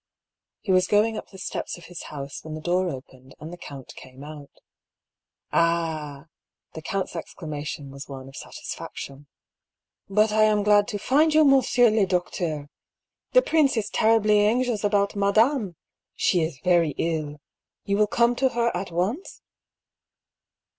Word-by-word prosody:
He 195 - -2
was 185 0 +4
going 215 +2 +3
up - - -7
the 190 - -13
steps 190 - -5
of 175 - -14
his 175 -2 -8
house 140 -1 -7
when 155 -1 -7
the - - -6
door 180 +3 0
opened, 130 -2 -10
and 155 +3 -8
the - - -5
count 140 -6 -10
came 130 +1 -12
out. 145 -1 -10 0.6
" - - -58
Ah 160 -4 0
I - - -22 0.3
" - - -54
The 160 - -7
count's 190 +2 -3
exclamation 150 -4 -6
was 140 +2 -10
one 135 -1 -8
of 135 - -13
satis - - -7
faction. 140 +1 -9 0.4
" - - -54
But 215 0 +5
I 215 0 +4
am 210 -1 +2
glad 205 0 +4
to 210 - -3
find 300 +9 +2
you, 310 -1 +6
monsieur 255 -4 +4
le 215 -3 +2
docteur! 170 -5 -2 0.6
The - - +6
prince 295 -6 +2
is 215 -1 -2
terribly 215 -1 +3
anxious 225 +1 +1
about 200 -1 +1
madame! 205 - +2 0.4
She 175 - +2
is 160 -4 -3
very 170 -5 +3
ill. 155 -3 -2 0.5
You 200 0 0
will 210 0 +3
come 235 +2 +2
to 265 0 +3
her 235 -3 0
at 185 +2 -3
once 190 - -3
185 Hz, 170 wpm, -25 LUFS, 155-215 Hz, 0.6 s, you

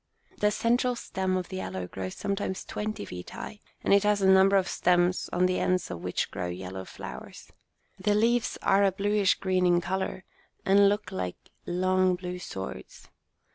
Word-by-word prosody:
The 210 - +4
central 245 +3 +1
stem 190 -5 -2
of 180 -2 -4
the 190 -1 -4
aloe 95 -1 -4
grows 95 +1 -6
sometimes 195 -1 -3
twenty 215 +1 -4
feet 90 0 -8
high, 210 - -8 0.2
and - - +3
it 200 - +6
has 210 0 +2
a 195 - +2
number 190 +1 +6
of 190 -2 +3
stems 175 +1 +2
on 180 +1 +2
the 185 0 +1
ends 185 0 0
of 85 - -6
which - - -2
grow 90 - -3
yellow 95 +1 -6
flowers. - - -9 0.5
The 205 +2 +2
leaves 230 +2 +2
are 195 +1 +4
a 195 - +4
bluish 200 +1 +2
green 185 -1 +1
in 175 0 +4
colour, 190 +1 -3 0.4
and 200 +1 +6
look 205 -1 -2
like 90 -1 -3 0.3
long 185 +1 +2
blue 180 0 -6
swords. 95 - -8
185 Hz, 175 wpm, -28 LUFS, 175-200 Hz, 0.5 s, it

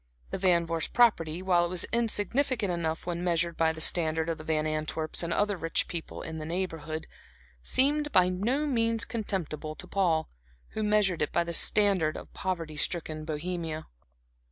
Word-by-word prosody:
The - - -3
Van 175 -3 +3
Vorst 165 -1 -2
property, 185 -8 +3
while 180 -2 +3
it 175 - -1
was 180 -1 -1
insignificant 230 0 +1
enough 165 -2 -2
when 175 0 -3
measured 170 -1 +1
by 160 -1 +3
the 160 0 -8
standard 160 -1 +3
of 165 - -2
the - - -8
Van 155 -1 0
Antwerps 155 0 0
and 170 -1 -2
other 205 +2 +1
rich 165 -2 0
people 170 -2 -6
in 160 0 -5
the 155 - -5
Neighborhood, 165 -3 -3 0.6
seemed 295 - +2
by 180 -1 +5
no 225 +11 0
means 230 -4 +1
contemptible 175 -9 -4
to 180 - -8
Paul, 175 -4 +1 0.4
who 220 - -4
measured 210 -4 +2
it 150 - 0
by - - +2
the 170 0 -5
standard 185 -4 +2
of - - -11
poverty 165 -5 -3
stricken 155 -2 -1
Bohemia. 160 0 -4
170 Hz, 175 wpm, -29 LUFS, 160-200 Hz, 0.6 s, by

